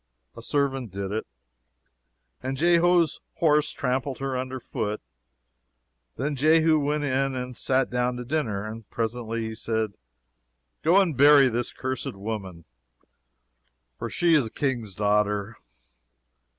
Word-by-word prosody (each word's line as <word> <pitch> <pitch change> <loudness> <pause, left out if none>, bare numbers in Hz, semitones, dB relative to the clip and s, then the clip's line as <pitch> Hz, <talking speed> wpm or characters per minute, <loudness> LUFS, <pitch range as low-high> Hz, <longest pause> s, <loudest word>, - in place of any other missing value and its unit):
A - - -9
servant 135 -2 -1
did 100 +1 -5
it, 110 +1 -3 1.1
and 130 +1 -3
Jehu's 170 +1 +3 0.2
horse 150 -2 +3
trampled 130 +1 -2
her 135 -1 -3
under 130 +1 -3
foot. 105 -3 -3 1.2
Then 145 +4 -2
Jehu 155 +2 +4
went 145 +1 0
in 135 -1 0
and 125 0 -4
sat 130 +2 +1
down 125 0 0
to 125 - -6
dinner; 115 -8 -1
and 110 0 -8
presently 115 0 -3
he 110 0 -4
said, 110 -1 -2 0.9
Go 175 +5 +5
and 180 -7 +2
bury 140 0 +7
this 120 +1 -2
cursed 130 -5 -4
woman, 95 -5 -6 1.3
for - - -4
she 170 -1 +2
is 145 -7 +4
a - - -8
King's 120 -7 -2
daughter. 105 +1 +1
125 Hz, 130 wpm, -26 LUFS, 110-145 Hz, 1.3 s, bury